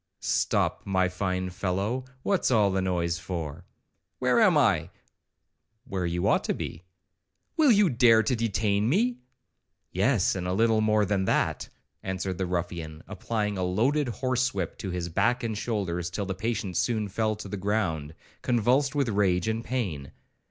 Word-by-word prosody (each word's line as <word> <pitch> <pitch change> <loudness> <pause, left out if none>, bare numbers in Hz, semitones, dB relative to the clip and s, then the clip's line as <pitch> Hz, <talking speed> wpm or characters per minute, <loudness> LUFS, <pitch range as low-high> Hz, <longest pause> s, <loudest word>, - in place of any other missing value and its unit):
'Stop, - - 0
my 95 -1 +1
fine 90 0 -2
fellow, 100 +7 -2 0.2
what's 195 -2 +1
all 105 -5 +3
this 95 0 0
noise 85 -2 -1
for?' 85 -1 -5 0.5
'Where - - +2
am - - +5
I?' - - +2 0.9
'Where 95 -9 -3
you 85 +1 -1
ought - - +3
to - - 0
be.' 85 +3 -6 0.7
'Will 305 -5 +5
you 210 -3 +5
dare 115 -4 +5
to 125 - +1
detain 105 -1 0
me?' 235 - +1 0.7
'Yes, - - +2
and 90 -1 -3
a 90 - 0
little 110 +2 +3
more 110 -1 +3
than 95 -1 0
that,' - - 0 0.3
answered 95 -1 -3
the 95 - -1
ruffian, 85 -3 -4
applying 105 0 -2
a - - 0
loaded 125 +11 +1
horse 130 0 -1
whip 90 -4 -3
to 95 - -4
his 90 -1 -3
back 120 +9 +1
and 110 -2 -2
shoulders, 95 -6 -2
till 100 +3 -3
the 95 - -3
patient 100 -2 -3
soon 110 -3 0
fell 110 +2 -1
to 105 -1 -8
the 100 - -5
ground 90 -7 -1 0.3
convulsed 130 +4 +2
with 140 -3 +1
rage 95 -3 +1
and 110 +1 -1
pain. 95 - -3
100 Hz, 165 wpm, -27 LUFS, 90-115 Hz, 0.9 s, am